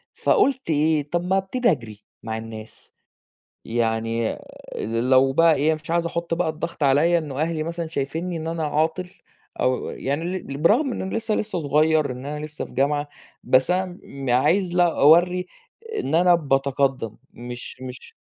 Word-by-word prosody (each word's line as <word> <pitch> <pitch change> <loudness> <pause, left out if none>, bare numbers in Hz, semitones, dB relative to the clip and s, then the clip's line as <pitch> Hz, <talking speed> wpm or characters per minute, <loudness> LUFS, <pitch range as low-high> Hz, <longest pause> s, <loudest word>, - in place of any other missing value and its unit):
فقُلت 270 -5 +2
إيه، 150 -1 +1
طَب 175 0 0
ما 190 +1 +2
أبتدي 235 +4 +1
أجري 110 -7 -5 0.2
مع 110 0 -3
الناس، 110 -1 -10 0.7
يعني 115 0 -1 0.4
ل 115 +4 -1
لو 135 +1 +5
بقى 165 +2 +5
إيه 155 +3 +2
مش 155 +1 -9
عايز 170 0 +1
أحُط 170 0 -2
بقى 175 -1 0
الضغط 160 0 -5
عليَّ 150 +5 +4
إنه 145 -3 -5
أهلي 160 -1 -1
مثلًا 170 0 -4
شايفينّي 160 +4 -3
إن 160 0 -5
أنا 165 -1 -2
عاطل 160 +4 -1 0.5
أو 130 0 +1
و - - -4
يعني 145 +5 -3
ل 180 -5 -4
ل 140 - -5
برغم 240 - +3
إن - - -4
أنا 190 - -4
لسه 225 -1 -1
لسه 210 -4 -2
صغيّر، 155 0 +2
إن 130 +2 -8
أنا 150 +1 -4
لسه 150 0 -6
في - - -14
جامعة، 145 +2 0 0.4
بس 130 +4 +3
أنا 180 0 -1
م 135 -2 -5
عايز 175 +9 +2
لا 175 -2 +2
أورّي 175 +4 +5 0.5
إن 270 - -2
أنا 175 +1 +5
باتقدّم 135 -6 0 0.2
مش 120 +1 -9
مش 125 0 -9
155 Hz, 175 wpm, -23 LUFS, 135-175 Hz, 0.7 s, لو